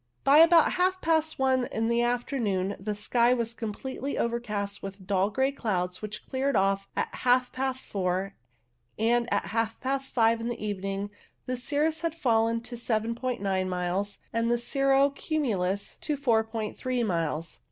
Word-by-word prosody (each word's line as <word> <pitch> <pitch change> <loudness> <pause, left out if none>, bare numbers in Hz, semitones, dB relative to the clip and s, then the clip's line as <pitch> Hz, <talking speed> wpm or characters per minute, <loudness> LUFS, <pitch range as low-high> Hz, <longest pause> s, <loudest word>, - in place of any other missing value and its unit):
By 280 +2 +6
about 330 0 +7
half 370 +1 +1
past 320 -2 +1
one 260 -2 +2
in 225 +1 -1
the 235 0 +2
afternoon 235 -6 0
the 210 +2 -3
sky 235 +4 +3
was 235 -1 -1
completely 255 +5 -4
overcast 210 -4 -2
with 195 -1 -8
dull 195 0 +2
grey 265 +5 +1
clouds, 180 -9 -2
which 210 0 -6
cleared 270 +1 -1
off 195 0 +2
at - - -2
half 250 0 +2
past 260 0 -2
four, 190 0 -1 0.6
and 235 +2 +2
at 200 - +1
half 225 0 -1
past 270 +1 -2
five 230 -1 +3
in 230 - -3
the 240 -1 -3
evening 195 0 -3 0.3
the 255 - -2
cirrus 295 +5 0
had 335 -1 -1
fallen 230 -5 +2
to 240 +1 -8
7*9 225 -4 -1
miles, 185 +3 -2 0.2
and 230 0 +1
the 240 - +3
cirro 275 +3 +2
cumulus 205 - -2
to 300 -2 -2
4*3 230 0 0
miles. 165 -4 -2
230 Hz, 155 wpm, -28 LUFS, 200-265 Hz, 0.6 s, about